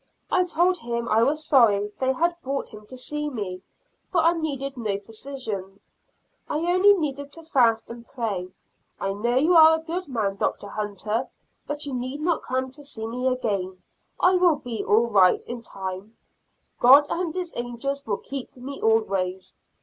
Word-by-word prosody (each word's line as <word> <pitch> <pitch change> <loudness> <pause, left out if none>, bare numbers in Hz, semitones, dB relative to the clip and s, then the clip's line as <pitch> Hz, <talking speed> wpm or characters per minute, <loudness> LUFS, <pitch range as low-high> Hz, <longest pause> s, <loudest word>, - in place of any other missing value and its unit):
I 365 - +3
told 355 +1 +2
him 235 -3 -3
I 220 +1 +4
was 305 +6 +1
sorry 210 -8 +4
they 260 0 +2
had 340 +6 +1
brought 275 +1 -3
him 210 -1 -13
to 255 - -10
see 295 +3 -3
me, 200 -8 -5 0.5
for 360 - +1
I 335 +1 +4
needed 275 -5 -3
no 215 -5 -2
physicians, 215 -3 -6 0.7
I - - 0
only 365 +5 +5
needed 285 -4 -3
to 330 - -11
fast 235 -8 +2
and 235 0 -10
pray. 210 -8 -3 0.5
"I 195 - -1
know 235 +5 -1
you 310 +7 +4
are 320 -1 +8
a 320 - -10
good 350 +2 -4
man, 215 -7 -1
Dr. 200 - -2
Hunter, 210 +4 -3 0.4
but 295 0 -3
you 280 - -5
need 255 +3 -4
not 330 +1 0
come 260 0 -2
to 290 +3 -12
see 220 -6 -5
me 250 +3 -2
again; 200 -7 -2 0.4
I 365 0 +4
will 355 -3 +4
be 245 -6 -5
all 225 +3 +4
right 195 -5 +4
in 240 0 -6
time; 195 0 -6 0.6
God 275 +4 +8
and 340 -1 -2
His 360 -2 -4
angels 245 +4 -3
will 205 -2 0
keep 270 -2 -7
me 275 +3 -8
always." 195 -4 0
255 Hz, 175 wpm, -25 LUFS, 215-300 Hz, 0.7 s, are